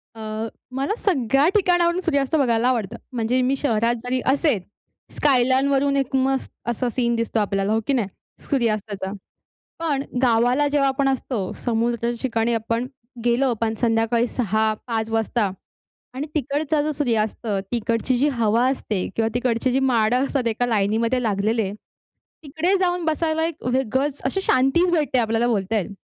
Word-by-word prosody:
अ, 220 0 -4 0.3
मला 275 +10 -1
सगळ्या 275 - +2
ठिकाणावरून 350 -2 +3
सूर्यास्त 280 -2 +1
बघायला 240 -5 +2
आवडतं. 230 -4 0 0.2
म्हणजे 245 +1 0
मी 260 +2 +1
शहरात 230 -3 +1
जरी 255 +1 -1
असेल, 280 - +2 0.6
स्कायलाईन 260 -1 +3
वरून 280 0 +2
एक 270 -1 -1
मस्त 265 0 0 0.2
असा 240 +1 -1
सीन 235 -2 +1
दिसतो 230 0 -1
आपल्याला, 200 0 0
हो 220 - +2
की 280 - +2
नाही, 235 -6 +1 0.4
सूर्यास्ताचा. 215 -6 -1 0.7
पण 290 -4 -1 0.2
गावाला 245 +4 +3
जेव्हा 285 -1 +2
आपण 270 0 +1
असतो, 245 -7 -2
समुद्राच्या 235 0 0
ठिकाणी 230 -2 0
आपण 230 +2 -1 0.4
गेलो 245 +2 +2
पण 220 -1 +1
संध्याकाळी 230 +1 +2
6-5 220 0 -1
वाजता 225 -2 0 0.6
आणि 275 +4 -4
तिकडचा 290 +2 0
जो 305 - -1
सूर्यास्त, 235 -6 -1 0.2
तिकडची 235 +2 0
जी 280 +4 +3
हवा 235 -2 +2
असते 215 -8 -2
किंवा 225 0 +1
तिकडची 245 +1 0
जी 265 - +2
माडं 250 -1 +2
असतात 270 -3 -1
एका 230 +2 0
लाईनीमध्ये 225 +3 +1
लागलेले, 215 -1 0 0.7
तिकडे 315 +7 0
जाऊन 355 -2 0
बसायला 320 0 0
एक 330 -1 -5
वेगळंच 265 +3 0
अशी 385 +9 0
शांतीच 270 +4 +3
भेटते 300 -6 +1
आपल्याला, 225 +1 +1
बोलता 215 -2 0
येईल. 200 +1 -3
245 Hz, 145 wpm, -22 LUFS, 225-275 Hz, 0.7 s, ठिकाणावरून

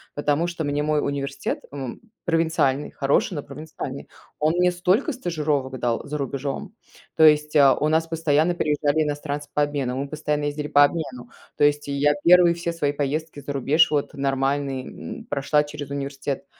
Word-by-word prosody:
потому 145 +3 +1
что 170 -2 -4
мне 145 0 -1
мой 150 0 +1
университет, 140 -1 -3
м 140 -1 -5
м, 120 - -8 0.2
провинциальный, 160 -5 +1
хороший, 140 +7 +1
но 145 - -4
провинциальный, 150 -3 -7 0.3
он 155 +2 +2
мне 180 0 +3
столько 185 - +1
стажировок 150 - -2
дал 120 -1 -1
за 150 +1 -3
рубежом, 140 - -4 0.4
то 160 - +5
есть, 150 0 +4
э, 140 -2 +7
у 150 - +1
нас 160 +1 +2
постоянно 165 +1 +1
приезжали 150 -1 +1
иностранцы 145 0 -4
по 150 - +1
обмену, 140 -4 -2
мы 140 +1 -3
постоянно 150 -1 -2
ездили 145 0 -3
по 145 - +6
обмену, 135 -6 -2 0.3
то - - +2
есть 145 0 +1
и - - -3
я 145 +1 +3
первые 175 0 +6
все 170 0 -3
свои 145 -4 -1
поездки 145 +1 -3
за 140 +1 -5
рубеж, 145 +4 +3
вот 145 0 -1
нормальные, 135 -1 -1 0.3
м, - - -13
прошла 145 +1 +1
через 145 -1 -8
университет, 140 0 -4
145 Hz, 175 wpm, -23 LUFS, 140-160 Hz, 0.4 s, э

